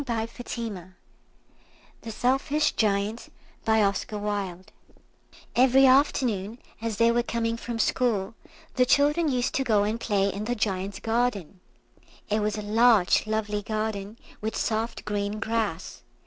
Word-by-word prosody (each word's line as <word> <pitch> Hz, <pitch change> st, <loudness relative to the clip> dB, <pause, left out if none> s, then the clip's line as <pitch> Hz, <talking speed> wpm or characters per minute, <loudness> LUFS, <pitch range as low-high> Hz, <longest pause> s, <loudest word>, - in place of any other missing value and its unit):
[Picture: 230 Hz, -5 st, -5 dB, 1.1 s
The 230 Hz, -, -8 dB
Selfish 270 Hz, +6 st, +1 dB
Giant] 210 Hz, +1 st, -1 dB, 0.4 s
EVERY 210 Hz, +5 st, -1 dB
afternoon, 245 Hz, -6 st, +2 dB, 0.2 s
as 225 Hz, -2 st, -3 dB
they 230 Hz, 0 st, +4 dB
were 240 Hz, +1 st, +2 dB
coming 230 Hz, -1 st, -2 dB
from 235 Hz, 0 st, -5 dB
school, 225 Hz, -3 st, 0 dB, 0.4 s
the 250 Hz, -, +5 dB
children 295 Hz, +4 st, +3 dB
used 250 Hz, -2 st, 0 dB
to 270 Hz, -, +1 dB
go 215 Hz, -5 st, +2 dB
and 215 Hz, +3 st, -1 dB
play 200 Hz, -4 st, +1 dB
in 205 Hz, +2 st, -4 dB
the 245 Hz, +2 st, -1 dB
Giant's 195 Hz, -3 st, -2 dB
garden. 225 Hz, -6 st, -1 dB, 0.7 s
It 215 Hz, -, +2 dB
was 210 Hz, 0 st, -1 dB
a 210 Hz, -, -4 dB
large 215 Hz, -2 st, +4 dB
lovely 210 Hz, -1 st, -1 dB
garden, 215 Hz, 0 st, -4 dB, 0.2 s
with 220 Hz, +1 st, -3 dB
soft 225 Hz, +1 st, -2 dB
green 205 Hz, 0 st, -2 dB
grass. 220 Hz, -6 st, -3 dB
220 Hz, 120 wpm, -26 LUFS, 205-240 Hz, 1.1 s, the